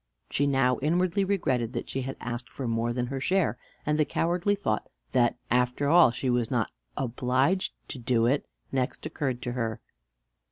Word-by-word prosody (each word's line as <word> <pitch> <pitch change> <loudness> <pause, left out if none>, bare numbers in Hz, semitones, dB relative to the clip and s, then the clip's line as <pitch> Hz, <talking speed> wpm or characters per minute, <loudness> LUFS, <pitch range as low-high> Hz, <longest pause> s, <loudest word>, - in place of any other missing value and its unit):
She 145 - +2
now 135 -2 +3
inwardly 180 +6 +2
regretted 130 - 0
that 120 - -3
she 135 - -2
had 135 +1 -5
asked 120 -1 -5
for 130 - -5
more 115 +1 0
than 120 0 -1
her 135 +2 -3
share; 185 +6 +1 0.3
and 150 +1 +1
the - - +6
cowardly 175 +6 +1
thought 110 - -1 0.2
that 120 -1 +3
after 125 +3 +2
all 170 -3 +7
she 125 +3 -3
was 120 -2 +1
not - - 0 0.3
obliged 130 +8 +1 0.2
to 130 - -6
do 115 -1 +2
it 135 +4 +1 0.2
next 130 -2 -1
occurred 130 -5 -2
to 125 - -2
her. 115 -3 -2
130 Hz, 175 wpm, -28 LUFS, 120-150 Hz, 0.3 s, all